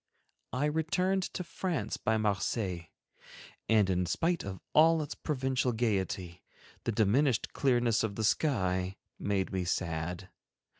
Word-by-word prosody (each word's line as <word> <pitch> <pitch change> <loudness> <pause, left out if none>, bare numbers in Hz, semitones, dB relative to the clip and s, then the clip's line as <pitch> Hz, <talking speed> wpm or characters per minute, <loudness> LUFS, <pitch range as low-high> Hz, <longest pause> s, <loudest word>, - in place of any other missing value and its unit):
I 130 +4 0
returned 180 +5 +1
to 180 - -2
France 165 - -3
by 110 0 +1
Marseilles, 100 -4 -1 0.8
and 110 -3 +5
in 90 -1 +1
spite 170 - 0
of 95 -1 -6
all 160 +1 +5
its 145 - -5
Provencal 130 -4 -1
gaiety, 95 -6 -1 0.4
the - - +1
diminished 115 +4 +2
clearness 120 -4 +2
of 105 -3 -2
the 110 - -2
sky 95 - +1 0.2
made 100 -2 -1
me 95 -1 0
sad. 90 +1 -2
110 Hz, 130 wpm, -31 LUFS, 95-145 Hz, 0.8 s, and